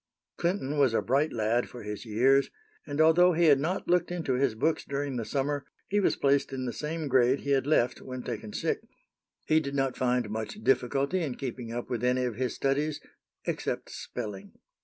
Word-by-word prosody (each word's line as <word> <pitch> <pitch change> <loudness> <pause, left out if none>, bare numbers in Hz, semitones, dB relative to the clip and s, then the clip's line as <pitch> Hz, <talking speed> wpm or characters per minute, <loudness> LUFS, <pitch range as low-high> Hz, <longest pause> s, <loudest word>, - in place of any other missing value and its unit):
Clinton 160 -5 -1
was 130 -5 +4
a - - +3
bright 140 +5 +2
lad 115 +2 0
for 120 - -9
his 105 +1 -6
years; 130 +6 +3 0.4
and, 145 0 -4
although 170 +3 +6
he 170 +1 +3
had 145 -4 +6
not 170 +7 -2
looked 175 0 +2
into 165 -7 -1
his 125 -2 +1
books 160 +8 +1
during 140 -1 -3
the 120 - -2
summer, 140 +4 -1 0.3
he 205 - +2
was 200 - +2
placed 140 0 +2
in 130 -1 -3
the 120 - -3
same 155 0 -3
grade 130 0 +3
he 140 - -2
had 135 0 +2
left 125 -5 +2
when 130 -1 -6
taken 110 -3 -5
sick. - - -1 0.6
He 155 0 +4
did 140 -2 -4
not 135 -2 0
find 125 -2 +1
much 110 0 -4
difficulty 135 +7 +1
in 140 -7 -2
keeping 125 -3 -5
up 120 +1 -4
with 120 -2 -3
any 125 +1 +2
of 120 - -2
his 125 +3 -2
studies 145 +2 0 0.5
except - - -3
spelling. 100 -2 -6
135 Hz, 200 wpm, -29 LUFS, 120-150 Hz, 0.6 s, although